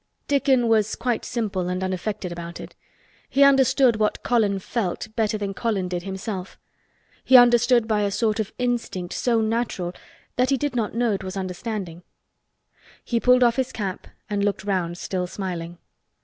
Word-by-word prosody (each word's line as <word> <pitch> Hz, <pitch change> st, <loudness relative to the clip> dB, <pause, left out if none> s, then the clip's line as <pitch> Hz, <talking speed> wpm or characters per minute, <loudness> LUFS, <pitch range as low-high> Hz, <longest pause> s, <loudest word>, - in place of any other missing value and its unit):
Dickon 270 Hz, -4 st, +3 dB
was 215 Hz, -2 st, +2 dB
quite 240 Hz, -1 st, -1 dB
simple 200 Hz, -6 st, -2 dB
and 180 Hz, +1 st, -2 dB
unaffected 190 Hz, 0 st, -3 dB
about 170 Hz, 0 st, -7 dB
it. -, -, -9 dB, 0.6 s
He 280 Hz, +1 st, +4 dB
understood 265 Hz, -3 st, +5 dB
what 215 Hz, -1 st, 0 dB
Colin 215 Hz, -5 st, +2 dB
felt 195 Hz, 0 st, -3 dB
better 215 Hz, -1 st, +1 dB
than 200 Hz, -1 st, -3 dB
Colin 200 Hz, -3 st, -1 dB
did 175 Hz, -1 st, -2 dB
himself. 190 Hz, 0 st, -6 dB, 0.7 s
He 260 Hz, -, +7 dB
understood 240 Hz, -1 st, +5 dB
by 215 Hz, -2 st, +1 dB
a 205 Hz, -, +1 dB
sort 215 Hz, +2 st, 0 dB
of 215 Hz, -, -2 dB
instinct 235 Hz, -8 st, -2 dB
so 235 Hz, -2 st, +1 dB
natural 220 Hz, -5 st, -1 dB, 0.4 s
that 250 Hz, +1 st, +2 dB
he 275 Hz, -, +3 dB
did 290 Hz, -1 st, -2 dB
not 225 Hz, -3 st, -1 dB
know 235 Hz, -1 st, +2 dB
it 195 Hz, -, -3 dB
was 190 Hz, +1 st, -5 dB
understanding. 185 Hz, -2 st, -5 dB, 1.0 s
He 235 Hz, -, 0 dB
pulled 250 Hz, +1 st, +5 dB
off 235 Hz, 0 st, +3 dB
his 260 Hz, -1 st, 0 dB
cap 195 Hz, -4 st, -5 dB, 0.2 s
and 205 Hz, -1 st, -1 dB
looked 205 Hz, -1 st, -1 dB
round 180 Hz, -4 st, -1 dB
still 180 Hz, 0 st, -3 dB
smiling. 175 Hz, -3 st, -5 dB
215 Hz, 165 wpm, -24 LUFS, 190-240 Hz, 1.0 s, He